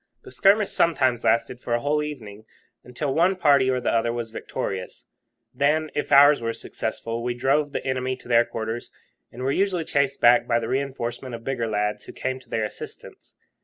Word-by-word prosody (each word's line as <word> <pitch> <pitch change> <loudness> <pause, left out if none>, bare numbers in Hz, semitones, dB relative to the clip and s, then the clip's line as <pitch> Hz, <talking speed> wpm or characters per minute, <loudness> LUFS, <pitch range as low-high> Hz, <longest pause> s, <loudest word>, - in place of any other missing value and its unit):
The 395 - -12
skirmish 205 - +3
sometimes 130 -8 +2
lasted 120 +1 +1
for 120 -1 -1
a - - 0
whole 145 +4 0
evening, 110 -8 -7 0.4
until 135 +3 -3
one 175 +5 +3
party 140 -7 +4
or 130 -1 +1
the 120 - -1
other 115 0 +1
was 120 -1 -5
victorious, 95 -4 -5 0.5
when, 155 +2 +1
if 150 - -3
ours 145 0 +7
were 115 0 -2
successful, 115 0 -5
we 120 0 -2
drove 140 +4 +1
the - - -4
enemy 130 -1 -1
to 130 - -16
their 120 -1 +5
quarters, 115 0 -5 0.4
and 125 +2 -8
were 135 - +1
usually 185 0 0
chased 140 -2 0
back 120 0 +5
by 115 - +2
the 115 -1 -3
reinforcement 130 -2 -3
of 115 - -10
bigger 125 -3 -2
lads 105 -1 -2
who - - -10
came 130 0 -3
to 130 -2 -22
their 110 - -1
assistance. 105 - -10
130 Hz, 195 wpm, -24 LUFS, 115-145 Hz, 0.5 s, ours